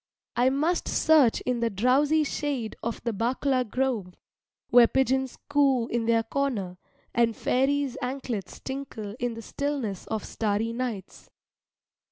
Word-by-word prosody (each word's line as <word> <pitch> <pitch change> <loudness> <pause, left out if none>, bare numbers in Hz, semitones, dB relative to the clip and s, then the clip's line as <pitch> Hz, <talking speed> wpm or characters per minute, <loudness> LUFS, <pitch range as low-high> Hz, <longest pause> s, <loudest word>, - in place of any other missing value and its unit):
I 245 +2 +4
must 305 +6 0
search 300 -8 +4
in 250 -1 -1
the 235 0 +1
drowsy 270 +9 +3
shade 280 -6 -3
of 230 0 -4
the 235 -1 -1
bakula 255 +4 +1
grove, 230 -8 -1 0.5
where 240 -1 +7
pigeons 265 0 0
coo 275 -4 +3
in 230 -1 -1
their 230 -1 +3
corner, 225 -9 -2 0.3
and 230 -1 +2
fairies' 275 +1 +1
anklets 250 -5 -4
tinkle 265 -6 -6
in 245 -1 -2
the 230 - -8
stillness 275 -10 -3
of 220 -2 -3
starry 220 +1 -1
nights. 230 -6 -5
245 Hz, 135 wpm, -27 LUFS, 225-275 Hz, 0.5 s, where